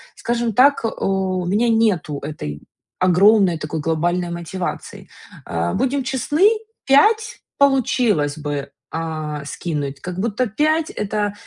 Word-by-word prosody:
Скажем 235 -2 -1
так, 275 +4 +4
э, 225 - +1
у 190 -3 -1
меня 210 +7 +1
нету 205 -10 +1
этой 75 - -6 0.4
огромной, 185 0 +4
такой 155 +1 -4
глобальной 170 +3 0
мотивации. 170 +1 -5 0.4
Э, 85 +1 -2
будем 270 +1 0
честны, 290 - +2 0.4
5 430 +11 +3 0.2
получилось 235 - +2
бы, 145 -2 -4 0.2
а, 155 -3 -4
скинуть, 145 -3 -4
как 180 0 -6
будто 230 +4 0
5- 310 +8 +1
это 210 0 -2
190 Hz, 120 wpm, -20 LUFS, 155-240 Hz, 0.4 s, так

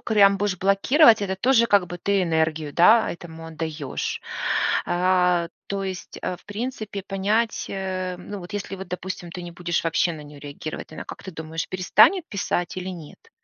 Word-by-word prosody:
прям 200 -3 +5
будешь 200 -2 -1
блокировать, 220 - +5
это 190 -1 -2
тоже 235 +2 +4
как 200 -3 +4
бы 175 +1 -7
ты 200 0 +1
энергию, 160 -3 0
да, 220 +9 +6
этому 165 -1 -9
отдаешь. 160 -3 -4 0.7
А, 180 -1 +2 0.2
то 200 0 -2
есть, 185 -1 -6
э, 180 - -2
в - - -24
принципе 215 -2 -4
понять, 210 +4 0
э, 185 -1 -3
ну 205 +2 -7
вот 180 +3 -10
если, 200 -1 -4
вот 190 -1 -8
допустим, 180 -1 -5
ты 180 +1 -7
не 175 - -8
будешь 175 -1 -2
вообще 165 +1 +2
на 155 - -8
нее 145 -1 -12
реагировать, 145 +2 -7
она, - - -7
как - - -9
ты 190 - -7
думаешь, 160 0 -5
перестанет 190 - +4
писать 190 -4 -2
или 185 0 -4
нет? 180 - -10
185 Hz, 180 wpm, -24 LUFS, 170-200 Hz, 0.7 s, да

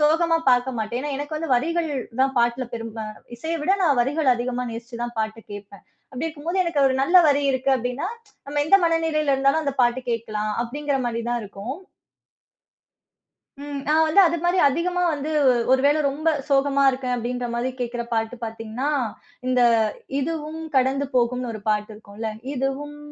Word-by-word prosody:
சோகமா 330 +2 +3
பார்க்க 245 -1 +2
மாட்டேன். 220 +3 -2
ஏன்னா, 295 0 -3
எனக்கு 290 +2 -4
வந்து 320 -4 -2
வரிகள் 330 +5 -1 0.3
தான் 270 0 +1
பாட்டுல 240 +2 +1
பெரும்பா 225 -1 -6 0.3
இசைய 325 +6 -2
விட 380 +6 +3
நான் 285 -7 +3
வரிகள 285 +3 0
அதிகமா 250 +1 -2
நேசிச்சு 235 +1 -7
தான் 240 0 -7
பாட்டு 220 +1 -4
கேப்பேன். 200 -1 -10 0.3
அப்படி 265 +5 -3
இருக்கும் 310 -1 -8
போது, 365 +3 0
எனக்கு 335 -4 0
ஒரு 260 - 0
நல்ல 350 +7 +4
வரி 285 0 +3
இருக்கு, 265 +1 0
அப்படினா, 250 +6 -3 0.4
"நம்ம 290 +1 -1
எந்த 390 - +7
மனநிலையில 320 -3 +1
இருந்தாலும் 275 +4 +2
அந்த 280 -1 -1
பாட்டு 240 +1 +2
கேட்கலாம்!" 215 -2 -2
அப்படிங்கிற 285 +4 -2
மாரி 235 -1 -2
தான் 240 0 0
இருக்கும். 205 +6 -6 1.9
ம். 285 -1 -5
நான் 315 +1 +4
வந்து 315 +6 +5
அது 340 - -1
மாதிரி 350 +1 +2
அதிகமா 355 +5 -1
வந்து 295 +1 -3 0.4
ஒரு 260 - +4
வேளை 295 +2 +3
ரொம்ப 305 +4 -1 0.2
சோகமா 280 0 +3
இருக்கேன், 255 -1 -2
அப்படின்ற 245 +1 -3
மாதிரி 240 +2 -1
கேக்குற 240 0 -2
பாட்டு 225 +2 -1
பாத்தீங்கன்னா, 225 +5 -4 0.6
இந்த 255 -1 +2 0.6
இதுவும் 315 +2 -3 0.2
கடந்து 265 +2 +2
போகும்னு 250 0 +1
ஒரு 215 - -7
பாட்டு 210 0 0
இருக்கும்ல. 215 +1 -6 0.2
இதுவும் 275 +3 -3
265 Hz, 165 wpm, -23 LUFS, 235-300 Hz, 1.9 s, எந்த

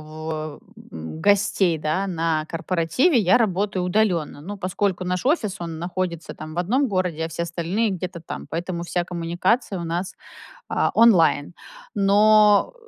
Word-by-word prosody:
в 155 +1 -8
а, 155 -1 -5 0.3
м, 80 - -7
гостей, 195 -2 +2
да, 155 +6 -1
на 165 -3 -1
корпоративе 185 - +1
я 190 +1 +4
работаю 200 -3 0
удалённо. 180 -7 0
Ну, 200 +6 -7
поскольку 185 0 -1
наш 180 +5 -2
офис, 220 - +1
он 165 -1 -5
находится, 175 -2 -4
там, 155 +1 -8
в - - -5
1 250 +11 +1
городе, 180 -6 -1
а - - -3
все 165 +1 -4
остальные 175 +6 -1
где-то 180 -1 -5
там. 160 - -7
Поэтому 170 +1 -4
вся 175 0 -1
коммуникация 175 +4 -1
у - - -4
нас, 175 +3 -3 0.5
а, - - +1
онлайн. 175 -8 +4 0.4
Но, 210 - +4
180 Hz, 155 wpm, -23 LUFS, 165-200 Hz, 0.5 s, я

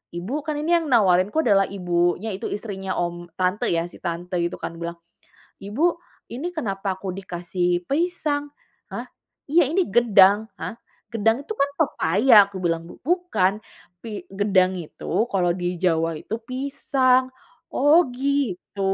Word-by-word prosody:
"Ibu" 180 +8 -5
kan 305 -1 -2
ini 340 +3 +3
yang 330 - -5
nawarinku 200 - +4
adalah 195 -4 +4
ibunya, 175 +1 0
itu - - -7
istrinya 195 -3 -4
om 175 0 -3
tante 185 +2 0
ya, 165 0 +1
si - - -14
tante 175 +1 -4
itu 170 0 -1
kan 165 - -5
bilang, 170 0 -4 0.7
"Ibu, 210 +11 -2 0.5
ini 275 +9 -3
kenapa 195 -8 -2
aku 190 -1 -5
dikasih 180 -1 -2
pisang? 295 - -1 0.4
Hah? - - -5 0.5
Iya 320 -2 +4
ini 360 +5 +2
gedang. 210 -2 +5
Hah, - - -5 0.4
gedang 225 +4 +1
itu 435 - -4
kan 280 -9 +1
pepaya," 225 - +3
aku 200 - -11
bilang. 165 -1 -1
"Bu - - -12
bukan. 295 - +1 0.4
Pi 215 -1 -7
gedang 195 -2 +2
itu 160 - -11 0.3
kalau 180 -3 +2
di 180 0 -2
Jawa 165 -2 +1
itu 220 - -5
pisang. 260 -1 +1 0.5
Oh 290 +5 +6 0.2
gitu." 265 -8 -2
200 Hz, 145 wpm, -23 LUFS, 180-270 Hz, 0.7 s, Oh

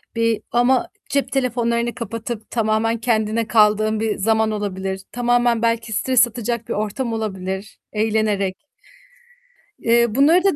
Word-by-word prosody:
bir 230 -1 +1
ama 255 +8 +3 0.2
cep 280 -1 0
telefonlarını 240 -2 0
kapatıp 230 0 -6
tamamen 225 0 +1
kendine 225 -1 0
kaldığın 215 -1 +3
bir 220 -1 -1
zaman 220 +2 +2
olabilir. 190 -2 -3
Tamamen 245 -1 +2
belki 230 -1 0
stres 250 +2 +3
atacak 235 -1 -4
bir - - -2
ortam 215 +4 -2
olabilir 190 -2 -4
eğlenerek. 210 -2 0 1.2
Eee, 235 -1 +2
bunları 315 +7 +5
da 390 -5 +3
225 Hz, 125 wpm, -21 LUFS, 215-240 Hz, 1.2 s, bunları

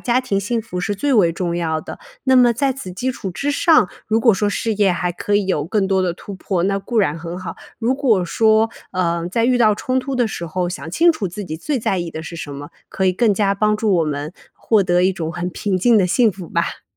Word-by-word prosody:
家 250 +1 +1
庭 205 -6 -1
幸 225 +3 -1
福 180 -5 -6
是 205 +2 -2
最 275 +5 +1
为 180 -6 +4
重 170 0 -2
要 160 -2 -1
的。 - - -9 0.2
那 260 -1 +4
么 245 -2 +6
在 270 +3 0
此 245 -8 -8
基 250 +8 -2
础 195 -5 -6
之 285 +11 -2
上， 315 - +4 0.2
如 220 +1 +2
果 230 -3 +4
说 205 +1 0
事 220 +1 -1
业 200 -2 +3
还 175 0 -1
可 205 +3 0
以 200 -2 0
有 150 -6 0
更 195 +3 0
多 190 -1 +1
地 175 -2 0
突 195 +3 -9
破， 185 -2 -2
那 195 0 +1
固 230 +3 -2
然 160 -6 +2
很 170 +2 -6
好。 185 - -6 0.2
如 245 +3 +1
果 230 -10 +2
说， 220 +4 +3 0.2
呃， 170 -2 -1
在 230 +5 0
遇 250 0 +3
到 215 -3 +4
冲 255 +3 -1
突 270 0 -4
的 245 - +2
时 175 -5 -5
候， 175 +2 -2
想 160 -3 -6
清 335 - +4
楚 205 - -3
自 200 +3 -7
己 160 -2 -5
最 280 - -2
在 195 -4 -1
意 170 -1 -4
的 160 - -6
是 170 - -8
什 145 -3 -6
么， 145 +1 -8 0.2
可 190 - -1
以 185 - +3
更 220 +2 +2
加 200 0 +1
帮 210 +1 +1
助 210 -3 +1
我 165 - +2
们 150 +2 -4 0.2
获 215 -3 +2
得 180 -1 +2
一 190 - +3
种 165 -3 -4
很 175 +2 -3
平 195 +1 -2
静 230 +4 +4
的 185 - +3
幸 225 +1 +3
福 180 -3 -10
吧。 170 0 -2
195 Hz, 285 characters per minute, -19 LUFS, 175-230 Hz, 0.2 s, 么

